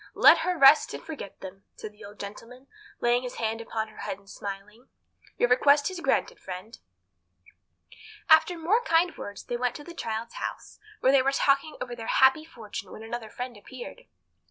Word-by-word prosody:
Let -, -, +7 dB
her 365 Hz, -1 st, -1 dB
rest 275 Hz, +1 st, +6 dB
and -, -, -9 dB
forget 295 Hz, -11 st, -8 dB
them," 195 Hz, +1 st, -10 dB
said 215 Hz, -, -8 dB
the 210 Hz, +1 st, -16 dB
old 205 Hz, 0 st, -12 dB
gentleman, 230 Hz, +6 st, -9 dB, 0.4 s
laying 240 Hz, +1 st, +3 dB
his 250 Hz, -1 st, -6 dB
hand 225 Hz, 0 st, -2 dB
upon 220 Hz, -1 st, -4 dB
her 215 Hz, -, -18 dB
head, 190 Hz, -, -4 dB
and 200 Hz, 0 st, -24 dB
smiling 200 Hz, +3 st, -8 dB
at 255 Hz, -, -29 dB
her. -, -, -32 dB
"Your 245 Hz, -, +2 dB
request 285 Hz, +6 st, +4 dB
is 370 Hz, -, -6 dB
granted, -, -, 0 dB
friend." 190 Hz, +5 st, -8 dB, 1.5 s
After 320 Hz, +2 st, +5 dB
more 365 Hz, +9 st, +2 dB
kind 335 Hz, 0 st, +2 dB
words 205 Hz, -1 st, -8 dB
they 240 Hz, -, -3 dB
went 250 Hz, 0 st, -1 dB
to 295 Hz, -, -8 dB
the 345 Hz, -, -10 dB
child's 230 Hz, -7 st, -4 dB
house, -, -, -6 dB, 0.2 s
where 260 Hz, -, +5 dB
they 275 Hz, -1 st, +5 dB
were 270 Hz, +1 st, +2 dB
talking 275 Hz, +2 st, +1 dB
over 245 Hz, -1 st, -5 dB
their 225 Hz, -1 st, -8 dB
happy 265 Hz, +4 st, +4 dB
fortune 215 Hz, -, -8 dB
when 220 Hz, -, -9 dB
another 225 Hz, 0 st, -6 dB
friend 250 Hz, +1 st, -6 dB
appeared. 240 Hz, +4 st, -10 dB
245 Hz, 195 wpm, -27 LUFS, 215-285 Hz, 1.5 s, Let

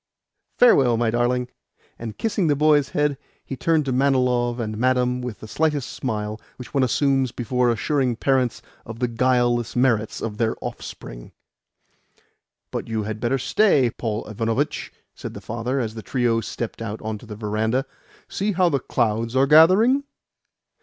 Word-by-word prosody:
Farewell, 135 Hz, -, +5 dB
my 115 Hz, -1 st, +1 dB
darling." 120 Hz, +1 st, 0 dB, 0.5 s
And, 115 Hz, -2 st, -7 dB
kissing 205 Hz, -5 st, 0 dB
the 145 Hz, -, +3 dB
boy's 150 Hz, -1 st, +3 dB
head, 150 Hz, -2 st, 0 dB, 0.3 s
he 135 Hz, -, -5 dB
turned 155 Hz, +3 st, +1 dB
to 135 Hz, -, -1 dB
Manilov 125 Hz, -2 st, +1 dB
and 110 Hz, -2 st, -3 dB
Madame 125 Hz, 0 st, +1 dB
with 125 Hz, -4 st, -6 dB
the 110 Hz, -, -8 dB
slight 150 Hz, +4 st, 0 dB
smile 110 Hz, -4 st, -4 dB
which 125 Hz, -, -11 dB
one 140 Hz, -, +2 dB
assumes 135 Hz, 0 st, +2 dB
before 125 Hz, +1 st, 0 dB
assuring 125 Hz, +2 st, 0 dB
parents 130 Hz, -1 st, 0 dB, 0.2 s
of 115 Hz, 0 st, -9 dB
the 125 Hz, +1 st, 0 dB
guileless 120 Hz, -1 st, +1 dB
merits 120 Hz, -4 st, +1 dB
of 105 Hz, -2 st, -5 dB
their 115 Hz, -1 st, +1 dB
offspring. -, -, -8 dB, 1.4 s
"But -, -, -4 dB
you 110 Hz, -2 st, -2 dB
had 105 Hz, +1 st, -5 dB
better 120 Hz, +4 st, 0 dB
stay, 135 Hz, -, +3 dB
Paul 110 Hz, -1 st, -4 dB
Ivanovitch," 115 Hz, +7 st, -2 dB, 0.2 s
said -, -, -8 dB
the -, -, -6 dB
father 120 Hz, +4 st, -3 dB
as 110 Hz, -3 st, -2 dB
the 110 Hz, -, -7 dB
trio 120 Hz, -1 st, 0 dB
stepped 115 Hz, +1 st, -5 dB
out 110 Hz, -1 st, -4 dB
on 110 Hz, -1 st, -4 dB
to 120 Hz, -, -14 dB
the 105 Hz, -, -7 dB
verandah. 110 Hz, +5 st, -1 dB, 0.4 s
"See 205 Hz, +2 st, -2 dB
how 180 Hz, -1 st, +3 dB
the 140 Hz, -, 0 dB
clouds 115 Hz, -1 st, -1 dB
are 135 Hz, +1 st, +4 dB
gathering!" 185 Hz, -, +6 dB
125 Hz, 160 wpm, -23 LUFS, 115-135 Hz, 1.4 s, gathering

